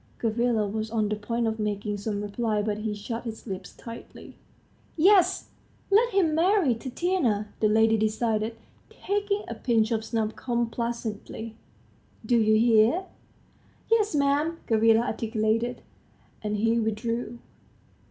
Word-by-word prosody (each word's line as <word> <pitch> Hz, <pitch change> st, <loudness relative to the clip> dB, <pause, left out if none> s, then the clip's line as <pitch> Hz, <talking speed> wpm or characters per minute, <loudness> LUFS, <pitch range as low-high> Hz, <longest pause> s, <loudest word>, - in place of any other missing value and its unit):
Gavrila 230 Hz, -1 st, +1 dB
was 215 Hz, +2 st, -3 dB
on 215 Hz, -2 st, 0 dB
the 210 Hz, -, 0 dB
point 230 Hz, +3 st, -2 dB
of 220 Hz, 0 st, -1 dB
making 210 Hz, 0 st, -2 dB
some 205 Hz, 0 st, -3 dB
reply, 210 Hz, 0 st, -1 dB
but 210 Hz, 0 st, -2 dB
he 215 Hz, 0 st, -2 dB
shut 230 Hz, +3 st, -5 dB
his 225 Hz, -2 st, -7 dB
lips 190 Hz, -4 st, -6 dB
tightly. 230 Hz, 0 st, -11 dB, 0.6 s
"Yes!... 370 Hz, +2 st, +4 dB, 0.4 s
let 465 Hz, +4 st, +4 dB
him 370 Hz, -6 st, +2 dB
marry 345 Hz, -, +3 dB
Tatiana," 245 Hz, -, -1 dB
the 215 Hz, -, +3 dB
lady 220 Hz, +1 st, +4 dB
decided, 220 Hz, +1 st, 0 dB, 0.3 s
taking 410 Hz, +1 st, -2 dB
a -, -, -4 dB
pinch 225 Hz, -1 st, +1 dB
of 220 Hz, -1 st, 0 dB
snuff 220 Hz, -1 st, -2 dB
complacently, 235 Hz, -2 st, -3 dB, 0.7 s
"Do 240 Hz, +2 st, +3 dB
you 215 Hz, -1 st, +4 dB
hear?" 230 Hz, -, +4 dB, 0.9 s
"Yes, 430 Hz, -6 st, +3 dB
'm," 290 Hz, +3 st, +1 dB
Gavrila 225 Hz, 0 st, +4 dB
articulated, 225 Hz, 0 st, -1 dB, 0.6 s
and 210 Hz, 0 st, -2 dB
he 225 Hz, +2 st, +2 dB
withdrew. 230 Hz, +2 st, -2 dB
225 Hz, 130 wpm, -26 LUFS, 215-245 Hz, 0.9 s, Yes